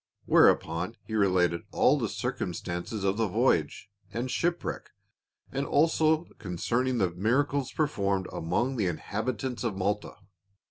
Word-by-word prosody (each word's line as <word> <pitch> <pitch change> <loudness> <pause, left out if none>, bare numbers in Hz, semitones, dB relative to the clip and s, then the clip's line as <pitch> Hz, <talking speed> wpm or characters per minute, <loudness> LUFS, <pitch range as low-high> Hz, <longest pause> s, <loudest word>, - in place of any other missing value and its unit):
Where - - +7
upon 85 +7 -1
he 110 - -9
related 90 -5 +2
all - - +4
the - - -1
circumstances 90 +4 -4
of 100 +1 +1
the 115 -1 +1
v^oyage - - +1 0.3
and 125 +2 -3
shipwreck, 175 +1 -2 0.6
and 135 - -1
also 160 +2 +3 0.2
concerning 120 +7 -1
the 95 -5 +1
miracles 130 +9 0
per 155 - +1
formed 100 -8 -1
among 120 +11 -1
the 100 -4 +1
inhabitants 115 +8 -3
of 110 -5 -2
Malta. 100 +2 -1
110 Hz, 135 wpm, -28 LUFS, 95-130 Hz, 0.6 s, Where